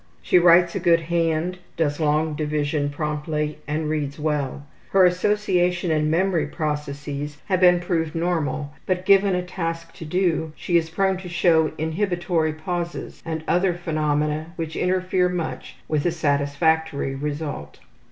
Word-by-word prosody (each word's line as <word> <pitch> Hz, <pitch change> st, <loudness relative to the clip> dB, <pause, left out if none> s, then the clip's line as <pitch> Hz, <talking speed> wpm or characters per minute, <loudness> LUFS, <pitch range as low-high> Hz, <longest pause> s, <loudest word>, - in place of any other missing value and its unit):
She 180 Hz, -, +4 dB
writes 175 Hz, 0 st, +6 dB
a -, -, -2 dB
good 170 Hz, -2 st, +4 dB
hand, 165 Hz, +1 st, 0 dB, 0.2 s
does 145 Hz, -2 st, 0 dB
long 155 Hz, 0 st, +1 dB
division 150 Hz, -1 st, -1 dB
promptly, 150 Hz, 0 st, -3 dB
and 155 Hz, +1 st, -1 dB
reads 150 Hz, -2 st, -2 dB
well. 145 Hz, -2 st, -2 dB, 0.2 s
Her 190 Hz, -1 st, +5 dB
association 180 Hz, -2 st, +1 dB
and 155 Hz, -1 st, +1 dB
memory 175 Hz, +1 st, +1 dB
processes 145 Hz, -1 st, -4 dB
have 185 Hz, -2 st, +1 dB
been 180 Hz, -1 st, +6 dB
proved 165 Hz, -3 st, -1 dB
normal, 160 Hz, -4 st, -1 dB
but 185 Hz, 0 st, -1 dB
given 195 Hz, -1 st, +5 dB
a 180 Hz, -, -1 dB
task 165 Hz, -2 st, -4 dB
to 160 Hz, -, -7 dB
do 160 Hz, -2 st, 0 dB
she 175 Hz, -, -2 dB
is 165 Hz, -1 st, +3 dB
prone 190 Hz, +2 st, +1 dB
to 180 Hz, -1 st, -8 dB
show 165 Hz, -2 st, +3 dB
inhibitory 170 Hz, -1 st, 0 dB
pauses 170 Hz, +2 st, -5 dB
and 160 Hz, -1 st, -4 dB
other 180 Hz, 0 st, +2 dB
phenomena 155 Hz, -1 st, -1 dB
which 160 Hz, -1 st, -5 dB
interfere 185 Hz, 0 st, +1 dB
much 175 Hz, -3 st, -4 dB
with 150 Hz, -2 st, 0 dB
a -, -, +2 dB
satisfactory 145 Hz, -1 st, 0 dB
result. 145 Hz, -, -5 dB
160 Hz, 145 wpm, -23 LUFS, 150-180 Hz, 0.2 s, writes